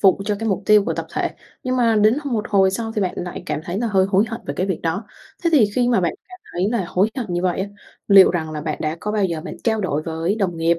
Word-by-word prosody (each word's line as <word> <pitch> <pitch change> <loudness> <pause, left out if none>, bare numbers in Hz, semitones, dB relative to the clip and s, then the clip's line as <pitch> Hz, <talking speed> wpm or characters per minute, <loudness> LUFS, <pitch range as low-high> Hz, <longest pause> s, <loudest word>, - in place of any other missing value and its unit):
vụ 195 -1 +4
cho 210 0 0
cái 225 +1 -2
mục 195 0 -1
tiêu 210 -1 +6
của - - -1
tập - - -4
thể, - - -1 0.3
nhưng 255 0 -1
mà 230 -3 +3
đến 215 +2 +5
hồi 285 -3 -5
một 215 -2 -1
hồi 195 -2 +4
sau 225 +3 -3
thì 210 - -1
bạn 185 - -1
lại 175 0 -5
cảm - - -2
thấy 180 +4 -3
là 235 - 0
hơi 190 -3 +2
hối 195 +2 +3
hận 230 0 -5
về 140 - -3
cái 185 - 0
việc 190 -4 -2
đó. 165 +6 -1 0.4
Thế 335 - +3
thì 280 -8 +6
khi 245 -1 +2
mà 235 -6 +3
bạn 170 -2 0 0.2
cảm 370 - -12
thấy 185 +3 0
là 230 -6 0
hối 195 +5 +2
hận 245 - -2
như 175 0 -1
vậy 185 0 0
á, 195 - -1 0.4
liệu 195 -2 +8
rằng 160 -3 -2
là 155 -1 -4
bạn 155 0 -3
đã 155 +1 -2
có 210 - -3
bao 210 -2 +1
giờ 170 -3 -2
bạn - - -8
trao 220 -2 +1
đổi 155 -6 -1
với 165 +4 -1
đồng 190 -6 -1
nghiệp 165 +1 +2
195 Hz, 305 wpm, -21 LUFS, 175-220 Hz, 0.4 s, liệu